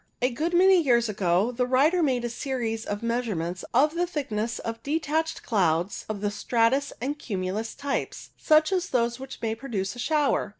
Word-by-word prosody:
A 250 +1 +1
good 320 +8 -1
many 375 0 +6
years 240 -5 +3
ago 195 +2 +1
the 250 0 -1
writer 295 +8 +3
made 255 -6 +1
a - - -2
series 235 -4 -3
of 205 +2 -4
measurements 210 -8 -2
of 290 +6 +3
the 350 +1 0
thickness 230 -8 -3
of 230 0 -5
detached 315 +2 -1
clouds 180 -3 0
of 210 -2 -4
the 205 -1 0
stratus 235 +6 +1
and 285 +4 -3
cumulus 200 +1 -3
types, 280 -1 -4
such 310 +2 +3
as 370 -2 0
those 235 -1 0
which 265 0 -8
may 220 -1 0
produce 225 -4 -4
a - - -10
shower. 295 -5 +1
245 Hz, 180 wpm, -26 LUFS, 215-290 Hz, -, many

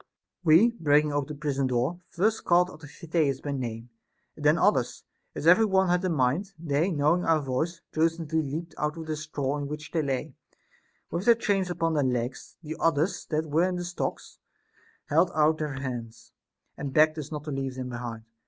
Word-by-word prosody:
We, 175 +9 +6
breaking 150 -8 +2
open 145 -1 -1
the - - -16
prison 140 -3 0
door, 130 +7 0
first 215 +6 0
called 180 +1 +3
out 155 - -13
Amphitheus 150 -2 -1
by 145 - -4
name, 120 -3 -5 0.4
and - - -10
then - - +5
others, - - +1 0.3
as - - -5
every 180 +7 +7
one 190 -2 +2
had 180 +1 +2
a 185 - +1
mind; 160 +6 0
they, 160 +2 0
knowing 160 +2 +2
our 165 -1 +3
voice, 155 +5 -2
jocundly 160 0 +1
leaped 155 +4 -5
out 150 +1 -1
of 165 - -6
their 155 0 -2
straw 145 -2 -3
in 145 - -3
which 150 +1 -7
they 165 - +1
lay, 135 -3 -2 0.8
with 175 +4 -2
their 235 - +7
chains 195 -5 0
upon 165 -2 0
their 145 -2 +2
legs. 125 -1 -3
The 155 0 -6
others 165 +3 +1
that 155 0 -1
were 170 +5 +3
in 185 - -2
the 175 0 -3
stocks 175 0 -5 0.7
held 165 +4 +3
out 155 +1 +3
their 150 -2 -2
hands, 125 -4 -6 0.4
and 140 -2 -5
begged 155 +1 +4
us 150 0 -7
not 150 -1 -5
to 150 - -5
leave 135 -1 -3
them 130 -1 -5
behind. 120 -2 -6
155 Hz, 195 wpm, -27 LUFS, 140-170 Hz, 0.8 s, every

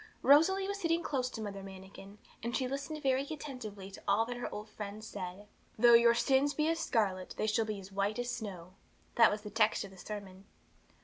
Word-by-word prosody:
Rosalie 380 +8 +5
was 400 0 -3
sitting 335 -1 +1
close 255 -3 -1
to 225 - -7
Mother 200 -2 -5
Manikin, 195 +1 -11 0.2
and 235 +2 -1
she 260 - -1
listened 275 +3 -5
very 265 -1 +3
attentively 250 -11 -7
to - - -11
all 205 +3 +3
that 245 +1 -5
her 245 - -4
old 210 +1 -6
friend 210 0 -7
said. 195 -1 -7 0.3
'Though 240 +2 +7
your 235 0 +7
sins 265 +4 +2
be 305 0 +1
as 330 0 0
scarlet, 195 - 0
they - - 0
shall 220 +1 +1
be 215 -2 -4
as 195 0 -11
white 200 +2 -1
as 245 0 -2
snow:' 185 -5 -6 0.4
that 230 -1 +7
was 210 0 -3
the 210 -1 -8
text 215 0 +2
of 195 - -9
the 190 - -15
sermon. 195 -1 -8
220 Hz, 210 wpm, -33 LUFS, 200-265 Hz, 0.4 s, Though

